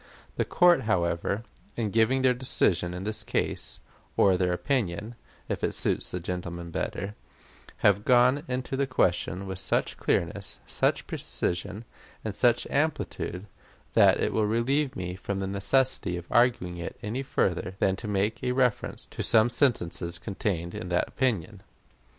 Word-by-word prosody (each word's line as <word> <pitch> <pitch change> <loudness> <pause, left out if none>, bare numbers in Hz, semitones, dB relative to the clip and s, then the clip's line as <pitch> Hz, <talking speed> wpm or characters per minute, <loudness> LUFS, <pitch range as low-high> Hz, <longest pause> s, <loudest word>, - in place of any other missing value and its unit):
The - - 0
court, 175 - +4
however, 95 +1 0 0.3
in 110 -3 -1
giving 115 +5 +3
their 130 -1 +5
decision 90 -8 +2
in 90 - -5
this 110 +1 0
case - - -1 0.4
or 95 -2 +5
their 90 0 +1
opinion, 100 +2 -1 0.3
if - - -3
it - - 0
suits - - -1
gentlemen 85 -1 -5
better 100 +4 -3 0.7
have 100 0 +5
gone 125 +3 +4
into 130 +1 -3
the 140 0 0
question 95 -5 0
with 95 -1 -4
such 95 - 0
clearness, - - -1
such - - 0
precision, 100 +5 -2 0.4
and 110 - -2
such 120 +3 +3
amplitude, 140 - -1 0.5
that - - +5
it - - 0
will 110 -1 +2
relieve 130 +6 +1
me 90 -1 -4
from 95 +1 -4
the 95 - -2
necessity 100 -1 +1
of 85 - -7
arguing 120 -8 +2
it 85 - -6
any 115 +5 -2
further 95 -8 -1
than 95 -1 +2
to 110 - -7
make 105 +4 -1
a 125 0 +1
reference 125 -4 0
to - - -7
some 115 +1 +4
sentences 85 - 0
contained 90 -3 -3
in 90 - -6
that 90 0 +1
opinion. 105 -6 -1
105 Hz, 150 wpm, -27 LUFS, 90-125 Hz, 0.7 s, their